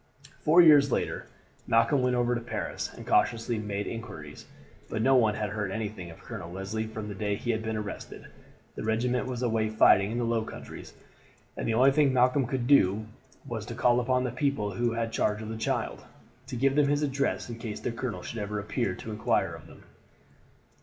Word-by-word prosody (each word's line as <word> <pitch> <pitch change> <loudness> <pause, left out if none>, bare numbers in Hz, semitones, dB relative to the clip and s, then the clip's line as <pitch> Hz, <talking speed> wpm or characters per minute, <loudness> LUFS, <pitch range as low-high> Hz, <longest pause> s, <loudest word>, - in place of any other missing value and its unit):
Four 170 +3 +6
years 145 -4 +7
later - - -2 0.4
Malcolm 115 +5 +3
went 125 0 +2
over 120 0 +1
to 120 - -2
Paris, 120 - -4
and - - -11
cautiously 115 -1 +1
made 105 -1 -3
inquiries; 80 -11 -8 0.4
but 110 - -1
no 135 - +5
one 110 -5 +4
had 105 -2 -3
heard 105 -2 -2
anything 105 -4 -5
of 80 - -13
Colonel 85 - -7
Leslie 95 +4 -4
from 110 -1 -6
the 105 - -5
day 105 0 -1
he 120 +4 -2
had 110 -1 -1
been 110 0 -3
arrested. 105 -1 -7 0.5
The - - -7
regiment 120 +3 0
was 125 -1 -3
away 110 -2 +1
fighting 100 -2 +5
in 120 - -2
the 120 - 0
Low 115 -1 +1
Countries, - - -10 0.6
and - - -4
the 115 - +1
only 130 +4 +6
thing 145 -1 +3
Malcolm 125 +1 +3
could 130 -2 -2
do 110 -6 +4 0.4
was 115 -3 -4
to 120 - -6
call 120 0 +3
upon 125 +1 +1
the 125 - -2
people 125 -5 -1
who 120 +4 0
had 115 - -2
had 115 0 -2
charge 105 -2 0
of 110 - -6
the 110 - -4
child, 110 - -2 0.4
to 135 - -5
give 135 +3 +2
them 145 -1 +4
his 145 +1 +1
address 140 -1 -1
in 115 -1 -7
case 110 -3 -5
the - - -3
colonel 115 0 -4
should 120 - -6
ever 105 0 -3
appear 100 -1 -2
to 110 - -8
inquire 105 +1 0
of - - -11
them. - - -15
115 Hz, 210 wpm, -28 LUFS, 105-125 Hz, 0.6 s, years